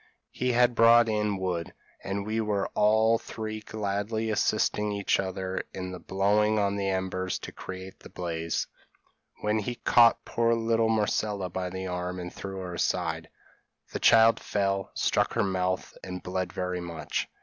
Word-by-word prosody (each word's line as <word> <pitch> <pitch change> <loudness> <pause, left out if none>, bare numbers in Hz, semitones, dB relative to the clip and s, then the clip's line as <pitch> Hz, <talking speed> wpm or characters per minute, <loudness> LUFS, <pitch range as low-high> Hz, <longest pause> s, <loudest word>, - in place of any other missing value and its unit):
He 125 -1 -1
had 120 0 +4
brought 115 0 +6
in 105 -2 0
wood, 90 -3 -3 0.3
and 100 +1 -3
we 110 +1 -1
were 105 -2 -1
all 110 +2 +3
three 110 -1 -5
gladly 110 +1 -2
assisting 105 0 +1
each 100 -1 +1
other 95 0 -3
in 90 -1 -5
blowing 105 +3 +2
on 100 -1 +1
the 100 -1 -1
embers 95 -1 -1
to - - -8
create 95 0 -8
the - - -13
blaze, 85 -2 -2 0.8
when 105 +1 +1
he 120 +4 -3
caught 120 0 +4
poor 115 0 +2
little 115 0 +1
Marcella 105 -3 0
by 90 0 -3
the 95 +1 -5
arm 90 0 -3
and 90 0 -6
threw 95 0 -6
her 90 -1 -6
aside; - - -1 0.6
the - - -3
child 115 0 +6
fell, 100 -1 -1
struck - - +1
her 115 - +2
mouth, 95 -1 -1
and 90 -1 -6
bled 90 0 -2
very 90 -1 -3
much. 85 -3 -3
100 Hz, 160 wpm, -28 LUFS, 95-110 Hz, 0.8 s, brought